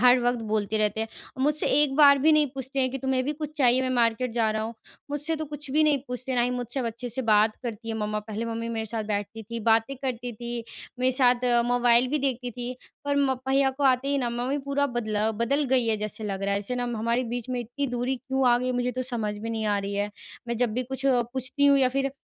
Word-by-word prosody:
हर 250 +1 +7
वक़्त 245 0 +1
बोलते 215 0 0
रहते 215 +1 +1
हैं 225 - -2 0.3
और 260 - -2
मुझसे 300 +2 +1 0.2
एक 280 -3 +1
बार 280 -2 +7
भी 315 +4 +4
नहीं 305 -1 +4
पूछते 270 0 -5
हैं 255 -1 +1
कि 270 - -4
तुम्हें 265 0 0
भी 295 - -1
कुछ 300 0 -6
चाहिए 255 -1 +4
मैं 255 - -1
मार्केट 235 +1 +2
जा 225 -2 +1
रहा 215 0 -1
हूँ 230 +1 -5 0.4
मुझसे 295 +3 -2
तो 315 - -3
कुछ 295 -2 -7
भी 305 +3 +3
नहीं 300 -2 +3
पूछते, 255 +1 -4
ना 240 - +2
ही 245 - +1
मुझसे 250 +1 -3
अब 240 - -2
अच्छे 235 +2 -5
से 260 +3 -3
बात 215 -1 +3
करती 230 -1 -6
है 225 - -2
मम्मा। 210 0 -1
पहले 215 +1 -5
मम्मी 230 0 -3
मेरे 225 -1 -3
साथ 220 0 -3
बैठती 210 +1 -3
थी 230 +2 -6
बातें 225 +4 +2
करती 245 -2 -4
थी 235 +1 -5 0.3
मेरे 255 +1 +3
साथ 250 -1 +3 0.2
मोबाइल 245 0 +4
भी 300 +2 0
देखती 255 -2 -2
थी। 245 +1 -5 0.3
पर 285 0 0
म 280 -2 +3 0.2
भैया 270 0 +3
को 285 - +1
आते 260 +1 +3
ही 285 - +1
ना 245 - 0
मम्मी 250 +4 -1
पूरा 280 +1 0
बदला 220 -3 -1
बदल 255 +7 0
गई 255 -3 +3
है 220 -1 +2
जैसे 215 +1 -5
लग 195 -1 -3
रहा 200 0 +1
है 200 - 0
जैसे 205 +5 -4
ना 245 0 -1
हमारे 235 +3 0
बीच 240 +1 -4
में 250 - -1
इतनी 245 +5 -3
दूरी 245 +1 -1
क्यों 265 +1 0
आ 240 - +5
गई 255 0 -1
मुझे 245 0 0
तो 255 +1 -2
समझ 225 -5 -3
में 225 +2 -5
नहीं 220 -1 -2
आ 205 -1 +2
रही 200 0 -4
है 205 0 0 0.4
।मैं 235 - -1
जब 240 -2 +1
भी 255 - 0
कुछ 265 +2 -6
पूछती 255 +2 +1
हूँ 280 0 +6
या 260 -1 +4
फ़िर 275 +1 -1
245 Hz, 260 wpm, -26 LUFS, 225-265 Hz, 0.4 s, हर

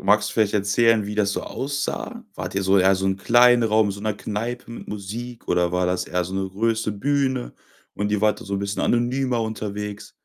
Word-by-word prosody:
Magst 105 +1 +3
du - - -9
vielleicht 110 -3 +2
erzählen, 105 +2 +3
wie 105 +1 -5
das 100 -1 +1
so - - -3
aussah? 140 +1 -4
Wart - - -5
ihr 100 - 0
so 95 +1 +4
eher 95 +1 +5
so 95 0 -3
'n 95 0 0
kleinen 120 +3 +5
Raum, 110 -1 +3
in - - -1
so 100 - -9
'ner 105 0 -1
Kneipe 115 +4 -4
mit 115 - -9
Musik 115 +4 -6
oder 90 -1 +2
war 90 0 +1
das 90 0 0
eher 90 0 -1
so 90 - -7
'ne 95 0 -1
große 110 +2 0
Bühne 130 +2 0 0.4
und 105 0 -2
ihr 105 -1 0
wart 105 0 +2
da - - -9
so 100 - -3
'n - - 0
bisschen 100 +1 -3
anonymer 120 0 +1
unterwegs? 105 -1 -5
105 Hz, 230 wpm, -23 LUFS, 100-115 Hz, 0.4 s, eher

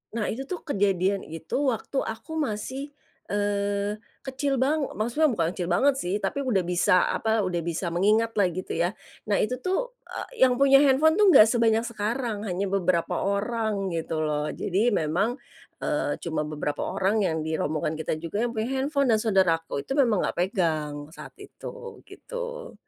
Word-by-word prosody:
Nah 220 -3 -1
itu 245 - -4
tuh 365 - -5
kejadian 195 - +1
itu 160 0 -9 0.2
waktu 255 +4 -2
aku 225 +9 -6
masih, 265 +2 -3 0.4
eee, 205 0 0 0.3
kecil 270 +1 -1
bang 290 +4 +2 0.2
maksudnya 240 +8 +2
bukan 170 -7 0
kecil 180 -1 -3
banget 270 +11 +4
sih 180 -5 -2
tapi 280 - -1
udah 205 -7 +2
bisa 180 +2 +2 0.2
apa 220 0 +1
udah 175 -2 -1
bisa 170 +1 -2
mengingatlah 210 +2 +3
gitu 185 +2 -5
ya. 170 +1 +2 0.4
Nah 205 - +3
itu 250 +4 -1
tuh, - - -1 0.4
e - - -10
yang 250 -1 +5
punya 275 0 +6
handphone 290 +3 +5
tuh 410 +3 +5
nggak 215 -11 +9
sebanyak 225 0 +2
sekarang 225 0 -2
hanya 190 +1 -1
beberapa 185 -3 0
orang 200 -1 -1
gitu 165 -1 -3
loh. 150 0 -1
Jadi 205 +6 0
memang, 200 - 0 0.4
eee, - - -1
cuma 160 -2 -1
beberapa 150 -1 -3
orang 205 +3 +1
yang 160 -4 0
dirombongan 155 -1 -1
kita 155 0 -3
juga 170 +6 -3
yang 240 - -2
punya 220 +2 -2
handphone 280 -1 +1
dan 215 - +2
saudaraku 170 -9 +1
itu 270 - -3
memang 240 -8 +3
nggak - - -3
pegang 165 -6 0 0.2
saat - - -11
itu 485 -1 -10
gitu. - - -7
210 Hz, 165 wpm, -26 LUFS, 180-260 Hz, 0.4 s, nggak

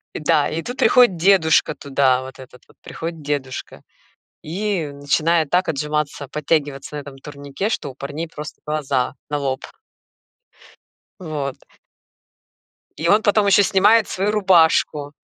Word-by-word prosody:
Да, 150 -1 +1
и 165 - -3
тут 245 +1 -6
приходит 240 -8 +4
дедушка 170 -3 +3
туда, 135 -2 +1
вот 130 0 -11
этот 125 -1 -14
вот, - - -24
приходит 165 -1 -7
дедушка, 140 -3 -5 0.6
и 190 0 -2
начинает 155 +3 +1
так 180 +1 +1
отжиматься, 150 -1 -2
подтягиваться 145 -1 -2
на - - -4
этом 140 -1 -11
турнике, 145 +7 -5
что 145 - -3
у - - -12
парней 145 +5 -6
просто 150 -1 -9
глаза 145 -5 -1 0.2
на 145 - -1
лоб. 135 -1 -3 1.6
Вот. 150 -5 -5 1.4
И 160 +3 -2
он 210 +4 +4
потом 205 0 +3
ещё 200 +1 +5
снимает 205 +4 +4
свою 200 +3 -1
рубашку. 165 -7 +2
150 Hz, 135 wpm, -20 LUFS, 140-180 Hz, 1.6 s, ещё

